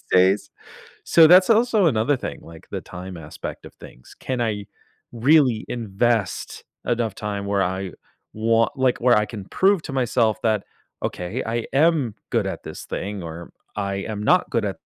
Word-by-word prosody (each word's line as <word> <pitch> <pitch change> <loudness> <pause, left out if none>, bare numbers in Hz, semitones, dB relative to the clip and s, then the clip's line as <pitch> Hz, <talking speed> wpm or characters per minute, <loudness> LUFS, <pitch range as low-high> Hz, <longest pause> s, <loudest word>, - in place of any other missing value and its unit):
these - - -25
days, 95 +2 +3 0.5
so, 165 -1 +7
that's 180 +3 +7
also 225 -4 +4
another 130 +1 +2
thing, - - -6
like, 80 0 -14
the - - -4
time 90 0 -8
aspect 80 -2 -8
of - - -12
things. 60 - -15
Can 130 -2 -3
I 105 -3 -2 0.5
really 125 -1 +3
invest 115 -2 -1 0.2
enough 115 -4 0
time 100 -1 -4
where 100 -1 +1
I 95 +1 -2 0.4
want 115 +1 +2
like, 130 -2 +2
where 125 +1 +5
I 105 - +2
can 105 -4 -8
prove 195 - +2
to 145 - -6
myself 120 -4 +1
that, 110 -3 +1 0.4
"Okay, 90 +8 -3
I 115 +1 -2
am 145 -5 +2 0.2
good - - +1
at - - -4
this - - -8
thing 100 -1 -5
or 85 +1 -8 0.3
I 100 -1 -2
am 105 +1 -4
not 180 +10 +3
good 115 - 0
at" 95 -3 -3
110 Hz, 175 wpm, -23 LUFS, 100-130 Hz, 0.5 s, so